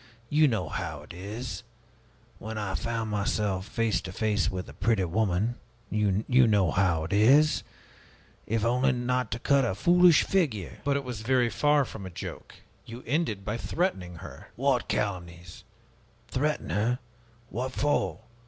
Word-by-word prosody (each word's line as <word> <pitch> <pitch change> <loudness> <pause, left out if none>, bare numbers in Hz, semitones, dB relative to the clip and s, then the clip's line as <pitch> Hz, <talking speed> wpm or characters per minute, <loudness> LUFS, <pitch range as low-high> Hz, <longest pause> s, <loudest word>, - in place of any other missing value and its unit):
You 150 +1 +5
know 110 - -1
how 75 -1 -5
it 75 - -11
is 105 +7 -6 0.8
when 110 +1 -6
I 105 -3 -3
found 115 -2 -2
myself 100 -1 -1
face 115 -2 0
to 95 -1 -7
face 105 -1 0
with 95 +2 -5
a - - -11
pretty 110 -5 +1
woman 105 +5 0 0.3
you 105 -1 +1 0.2
know 100 -6 +3
how 90 -5 +2
it 80 - -4
is 140 +9 +5 0.9
if 115 +1 0
only 125 +3 +2
not 125 -1 -1
to 115 - -2
cut 140 +3 +3
a 115 -6 0
foolish 175 - +5
figure!" 130 - -1
"But 140 0 +1
it 140 - -3
was 125 -4 -6
very 120 0 +2
far 145 -1 +3
from 100 -5 -8
a - - -7
joke! 85 - -8 0.3
You 120 +2 -10
ended 115 - -1
by 105 +2 -2
threatening 105 - -2
her!" - - -11
"What - - +1
calumnies! 85 -3 -4 0.7
Threaten 150 - -1
her? 110 +7 +1 0.5
What 130 +3 -3
for? 130 - 0
110 Hz, 155 wpm, -28 LUFS, 95-125 Hz, 0.9 s, You